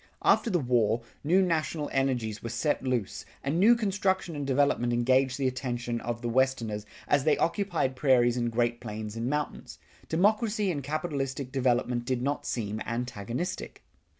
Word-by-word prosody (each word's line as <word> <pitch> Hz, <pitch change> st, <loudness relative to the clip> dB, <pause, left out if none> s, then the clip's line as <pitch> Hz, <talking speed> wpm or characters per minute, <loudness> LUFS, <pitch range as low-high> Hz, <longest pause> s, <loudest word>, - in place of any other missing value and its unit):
After 235 Hz, -, +4 dB
the 185 Hz, -, +2 dB
war, 120 Hz, -5 st, +1 dB, 0.2 s
new 180 Hz, +6 st, +4 dB
national 160 Hz, -3 st, -1 dB
energies 125 Hz, -6 st, 0 dB
were 115 Hz, -, -5 dB
set 130 Hz, +4 st, 0 dB
loose, 125 Hz, -6 st, -2 dB, 0.2 s
and 145 Hz, +5 st, 0 dB
new 225 Hz, +5 st, +7 dB
construction 195 Hz, -5 st, 0 dB
and 145 Hz, -1 st, -3 dB
development 135 Hz, -3 st, +2 dB
engaged 130 Hz, +2 st, +2 dB
the 135 Hz, -2 st, +1 dB
attention 120 Hz, -2 st, -3 dB
of 120 Hz, +1 st, -4 dB
the -, -, -1 dB
Westerners 115 Hz, -4 st, 0 dB, 0.2 s
as 145 Hz, -2 st, +3 dB
they 155 Hz, -, +3 dB
occupied 170 Hz, -7 st, 0 dB
prairies 125 Hz, -3 st, +3 dB
and 120 Hz, -1 st, -1 dB
Great 120 Hz, 0 st, 0 dB
Plains 105 Hz, 0 st, -6 dB
and 115 Hz, +2 st, -2 dB
mountains. 150 Hz, +1 st, -3 dB, 0.3 s
Democracy 210 Hz, +3 st, +2 dB
and 145 Hz, -4 st, -3 dB
capitalistic 140 Hz, -3 st, -3 dB
development 125 Hz, -2 st, +1 dB
did 125 Hz, -1 st, -1 dB
not 145 Hz, +1 st, -2 dB
seem 110 Hz, -2 st, -3 dB
antagonistic. 120 Hz, -, -4 dB
130 Hz, 155 wpm, -28 LUFS, 120-155 Hz, 0.3 s, new